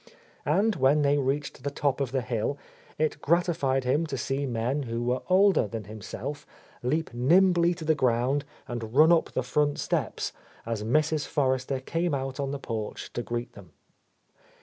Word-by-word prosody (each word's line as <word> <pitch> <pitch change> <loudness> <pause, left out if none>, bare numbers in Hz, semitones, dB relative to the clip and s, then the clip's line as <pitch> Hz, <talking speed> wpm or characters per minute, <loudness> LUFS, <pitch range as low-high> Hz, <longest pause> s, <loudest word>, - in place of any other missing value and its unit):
And 195 +5 +2
when 145 +2 +4
they 145 0 +3
reached 140 +1 -2
the 140 - -2
top 140 -1 -1
of 130 -3 -1
the 130 -2 0
hill, 115 +4 -1 0.4
it 155 0 -1
gratified 160 -5 +1
him 145 +6 +1
to 135 - -3
see 135 +3 -2
men 125 +4 -1
who 115 -2 -3
were 125 +1 0
older 190 - +5
than 110 +1 -5
himself 110 +7 -7 0.3
leap 150 +3 -1
nimbly 175 +7 +4
to 160 -2 -8
the 160 - +4
ground 130 +1 +1 0.2
and 115 -1 -5
run 155 +3 +7
up 170 -2 +3
the 130 - 0
front 145 +3 +1
steps - - -2 0.3
as 115 -2 -3
Mrs. 155 +6 +1
Forrester 130 -1 0
came 165 +4 -1
out 135 0 -4
on 140 -1 -1
the 140 - -3
porch 110 -5 -5
to - - -2
greet 120 0 -4
them. 90 -6 -14
135 Hz, 170 wpm, -27 LUFS, 120-155 Hz, 0.4 s, run